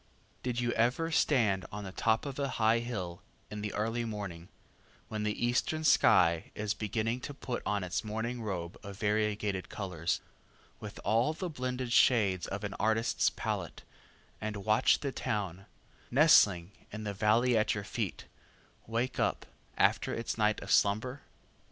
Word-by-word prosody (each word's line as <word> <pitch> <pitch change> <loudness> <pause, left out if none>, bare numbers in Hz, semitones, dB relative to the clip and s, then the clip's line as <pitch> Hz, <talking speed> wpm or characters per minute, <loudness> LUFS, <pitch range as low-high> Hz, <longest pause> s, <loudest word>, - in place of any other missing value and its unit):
Did 125 -1 -2
you 120 -1 0
ever 125 +9 +1
stand 110 - +2
on 105 0 -6
the 95 - -6
top 110 +5 +1
of 140 -1 -5
a 140 - 0
high 110 +1 +4
hill 95 -8 -5 0.3
in 105 0 -5
the 105 -1 -3
early 115 +3 -1
morning, 100 -6 -6 0.6
when 110 -1 -3
the 105 +2 -1
eastern 140 +6 0
sky 85 - +4
is 105 -1 -1
beginning 110 +3 -2
to 145 +2 -7
put 125 -3 -4
on 105 -2 0
its 90 - -2
morning 110 +3 -3
robe 90 -5 -4
of 100 -1 -9
variegated 105 -2 0
colors, 90 -5 -2 0.6
with - - -8
all 115 +7 +2
the 175 +2 -4
blended 125 -3 -3
shades 100 -9 +4
of 95 +2 -5
an 100 -1 -3
artist's 110 +1 +2
palette, - - -4 0.6
and 105 -2 -4
watch 110 0 +4
the 140 - -2
town, 100 -6 -3 0.4
nestling 100 - +5 0.2
in 110 +1 -6
the 105 -1 -3
valley 110 +5 +3
at 110 -1 +2
your 105 - -4
feet, 105 -1 -4 0.6
wake 115 +3 -2
up - - 0 0.3
after - - +2
its 115 - -3
night 110 -1 +2
of - - -5
slumber? 110 +7 +2
110 Hz, 155 wpm, -31 LUFS, 100-120 Hz, 0.6 s, nestling